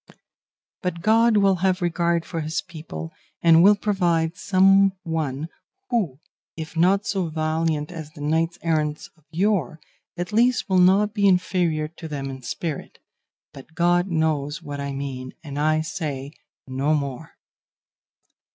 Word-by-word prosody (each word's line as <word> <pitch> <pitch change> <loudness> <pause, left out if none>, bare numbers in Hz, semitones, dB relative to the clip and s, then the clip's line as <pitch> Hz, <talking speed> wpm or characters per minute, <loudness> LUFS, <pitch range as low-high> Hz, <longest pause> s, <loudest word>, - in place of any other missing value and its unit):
But 175 -2 -3
God 225 +1 +4
will 195 -2 +4
have 185 +1 +1
regard 170 -1 0
for 165 -2 -4
his 155 +1 -2
people, 155 - -8 0.3
and 165 -1 +7
will 205 +3 +7
provide 175 -5 0
some 195 0 +4
one, 155 -3 -2 0.4
who, 180 - 0 0.4
if 160 0 -7
not 190 +5 +3
so 190 -4 -1
valiant 155 0 -1
as 160 -4 -7
the 150 -1 -13
knights 165 +3 0
errant 155 -2 -1
of 155 -3 -30
yore, 170 - 0 0.4
at 175 +3 -4
least 245 +3 +3
will 190 -2 +3
not 195 +4 +4
be 200 -2 +3
inferior 180 -4 +1
to 165 +1 -10
them 140 -3 -4
in 130 0 -8
spirit; 145 +5 -5 0.6
but 140 +4 -13
God 175 +2 +2
knows 155 -4 -1
what 145 0 -6
I 140 0 -3
mean, 135 -2 -5
and 145 -2 -6
I 155 +1 +2
say 145 -4 -4 0.3
no 135 +4 0
more." 140 -4 -5
165 Hz, 145 wpm, -23 LUFS, 150-185 Hz, 0.6 s, and